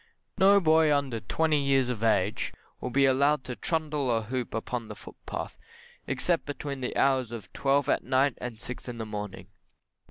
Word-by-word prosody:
No 200 +1 +7
boy 160 -3 +4
under 140 -5 0
twenty 155 +6 +1
years 135 -2 +3
of 125 -4 -3
age 105 -2 +1 0.3
will - - -4
be 135 +2 +3
allowed 140 +1 +3
to 125 - -6
trundle 150 -4 -1
a 115 -2 +1
hoop 125 +2 -4
upon 115 +1 -3
the - - -8
footpath, - - -8 0.5
except 165 +6 0
between 140 -1 -5
the 125 - -3
hours 130 -4 +2
of 110 -6 -8
twelve 140 0 +2
at - - +1
night 130 0 +2
and 120 -3 -6
six 125 +1 -6
in 120 - -6
the 110 - -4
morning. 105 -3 -6
130 Hz, 180 wpm, -28 LUFS, 115-145 Hz, 0.5 s, No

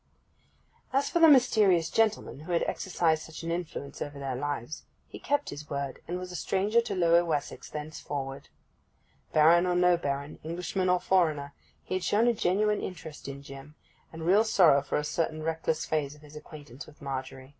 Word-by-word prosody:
As 275 +2 +1
for 345 - +2
the 330 - +8
mysterious 215 - +4
gentleman 220 -9 +1
who 160 +4 -5
had 170 - +2
exercised 165 -4 0
such 160 +1 -9
an 165 - -3
influence 165 -5 -5
over 145 0 -5
their 135 -2 -3
lives, 145 +1 -4 0.3
he - - -10
kept 290 0 -1
his 150 +1 -9
word, 140 -1 -4
and 175 - -3
was 180 0 -7
a - - -7
stranger 205 +6 +1
to 230 -4 -4
Lower 170 -1 +4
Wessex 150 -4 -3
thenceforward. 145 -3 -6 0.8
Baron 170 +3 +5
or 180 - +1
no 180 0 +4
Baron, 140 -2 -4
Englishman 180 +3 -2
or 180 0 +3
foreigner, 155 -7 +1 0.3
he - - -6
had 185 -1 -1
shown 215 +3 +2
a 240 - +4
genuine 210 +1 +1
interest 160 -6 -8
in 140 0 -7
Jim, 140 +2 -11 0.4
and 160 0 -7
real 195 +5 +5
sorrow 175 -10 +5
for 140 - -2
a 150 - -1
certain 155 0 -2
reckless 160 0 -1
phase 150 -2 -1
of 150 - -19
his 150 0 -14
acquaintance 145 -3 -11
with 155 - -17
Margery. 130 -1 -6
160 Hz, 185 wpm, -28 LUFS, 145-185 Hz, 0.8 s, the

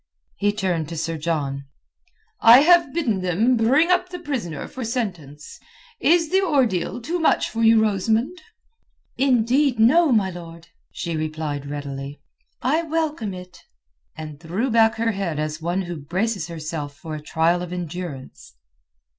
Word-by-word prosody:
He 205 0 +1
turned 180 -6 -2
to 165 - -6
Sir 165 +1 -2
John. 145 -4 -3 0.7
"I 235 +3 +8
have 340 -2 +5
bidden 240 - -1
them 195 +8 +2
bring 270 +10 +3
up 360 - +2
the 360 - -6
prisoner 260 - -4
for 260 - -7
sentence. 180 - -5 0.4
Is 330 0 +3
the 380 +1 +4
ordeal 250 - 0
too 330 +9 -3
much 320 - +2
for 230 - -3
you, 225 0 +6
Rosamund?" 220 - 0 0.8
"Indeed, 260 +1 +2
no, 295 +8 +5
my 205 -5 +2
lord," 170 -1 -11 0.2
she 170 -2 -4
replied 155 -2 -4
readily. 140 -1 -6 0.4
"I 300 +6 +2
welcome 310 - -2
it." 180 0 -12 0.6
And 155 -2 -8
threw 185 +10 -2
back 225 0 +4
her 230 0 0
head 190 -6 -3
as 155 +1 -3
one 175 +4 -1
who 175 -1 -6
braces 185 +5 -2
herself 155 -3 -6
for 155 +1 -8
a 155 - -5
trial 165 +3 +1
of 180 -1 -6
endurance. 175 - -7
190 Hz, 150 wpm, -22 LUFS, 160-250 Hz, 0.8 s, I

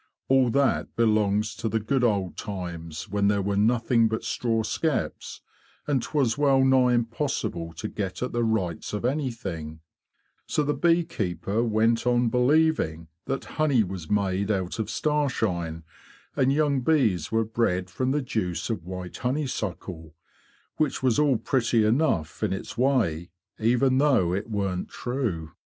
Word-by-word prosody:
'' - - -56
All 130 -2 +4
that 140 +4 +1
belongs 105 -2 +2
to 110 - -2
the 110 - 0
good 125 +4 0
old 100 -6 +1
times 85 -6 -6
when 100 +1 +1
there 100 0 +2
were 100 +1 -1
nothing 115 +2 +3
but 110 0 -3
straw 115 -2 0
skeps, 155 +7 -2 0.4
and 140 -4 +1
'twas 135 -2 0
well 135 -2 +4
nigh 130 -2 +4
impossible 115 - -2
to 80 - -5
get 95 +1 -4
at 125 - -3
the 120 0 0
rights 100 -8 -1
of 105 +3 -2
anything; 100 - -3 0.7
so 150 - +1
the 145 0 0
bee 170 +1 +3
keeper 100 - -2
went 115 +1 +2
on 120 -1 +3
believing 125 - +2 0.2
that 135 0 -3 0.2
honey 140 -7 +4
was 90 -4 -7
made 100 -1 0
out 95 -1 -1
of 110 - -2
starshine, 105 - -1 0.5
and 135 -2 +3
young 145 -2 +2
bees 115 - +2
were 115 0 +2
bred 105 -5 0
from 130 +8 -2
the 145 +1 0
juice 110 -4 -2
of 100 -7 -3
white 90 0 -7
honeysuckle, 100 - -3 0.6
which 150 -3 0
was 130 0 +3
all 145 -4 +3
pretty 115 -1 +1
enough 110 - +1
in 105 -3 0
its 95 - -6
way, 110 - +1 0.3
even 125 +4 +3
though 130 -12 +3
it 100 +5 -3
warn't 100 -4 -2
true. 110 - -3
115 Hz, 155 wpm, -26 LUFS, 95-130 Hz, 0.7 s, All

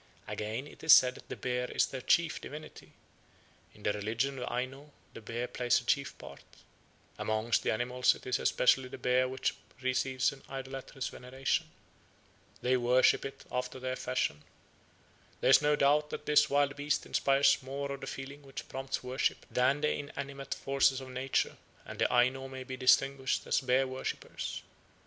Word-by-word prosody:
Again, 110 +5 -4
it 150 - -14
is 160 - +8
said 125 0 +7
that - - -15
"the - - -4
bear 125 0 -2
is - - +2
their 130 - -6
chief 165 +5 +2
divinity"; 155 +2 -10 0.8
"in 105 - -16
the 105 - +1
religion 115 +6 -2
of 125 - -4
the - - -6
Aino 135 +4 -4 0.2
the - - -9
bear 115 +3 -4
plays 125 -1 +1
a - - -12
chief - - 0
part"; - - -11 0.8
"amongst 110 +1 +1
the - - -1
animals 125 +3 +2
it - - -14
is 125 - 0
especially 130 +1 +3
the - - -8
bear 130 +1 +2
which 130 0 -1 0.3
receives 130 0 +1
an 135 -1 -13
idolatrous 135 0 -5
veneration"; 130 +2 -2 0.9
"they 130 +1 +3
worship 125 +1 +4
it 135 - -8
after 125 +1 -3
their 130 0 -3
fashion"; 75 - -1 1.0
"there - - +3
is - - +8
no 150 0 +3
doubt 150 +1 +3
that - - -6
this 150 0 +4
wild 140 0 +2
beast 145 +1 -1
inspires 140 0 +3
more 140 +2 -4
of 140 0 -6
the 135 - -6
feeling 140 +2 -7
which 135 -1 -8
prompts 135 0 -4
worship 130 +2 -1
than 130 +3 +2
the 150 - +2
inanimate 140 -1 -5
forces 135 -1 +2
of 130 -1 -9
nature, 130 +1 -1 0.3
and - - -9
the - - +2
Aino 130 +2 +2
may 130 -1 -7
be 130 0 -6
distinguished 135 +1 +2
as - - +1
bear 130 +1 +2
worshippers." 130 0 -5
130 Hz, 175 wpm, -31 LUFS, 125-140 Hz, 1.0 s, is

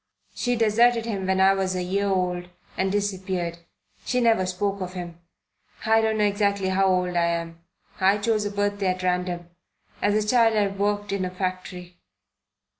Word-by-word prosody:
She 245 -1 -1
deserted 230 +1 +3
him 200 -5 -3
when 190 0 +1
I 190 +1 +6
was 190 -1 -1
a 180 - -1
year 200 +3 -1
old 180 -2 -1 0.3
and 190 0 0
disappeared; 190 -4 -2 0.4
she 250 - 0
never 225 -6 +3
spoke 195 +2 -2
of 180 0 -5
him. 175 -2 -7 0.7
I 225 0 +4
don't 220 0 0
know 210 - +2
exactly 200 -1 +1
how 190 +1 +2
old 180 -1 +1
I 170 -1 +3
am. 170 0 -3 0.4
I 195 +1 +4
chose 215 0 0
a 205 - -2
birthday 205 -1 -1
at 185 0 -1
random. 180 -1 -2 0.5
As 205 0 +2
a 215 0 0
child 230 -1 +4
I 205 -1 +2
worked 205 0 -1
in 200 -1 -1
a 185 - -2
factory. 180 -1 -5
195 Hz, 180 wpm, -24 LUFS, 180-205 Hz, 0.7 s, I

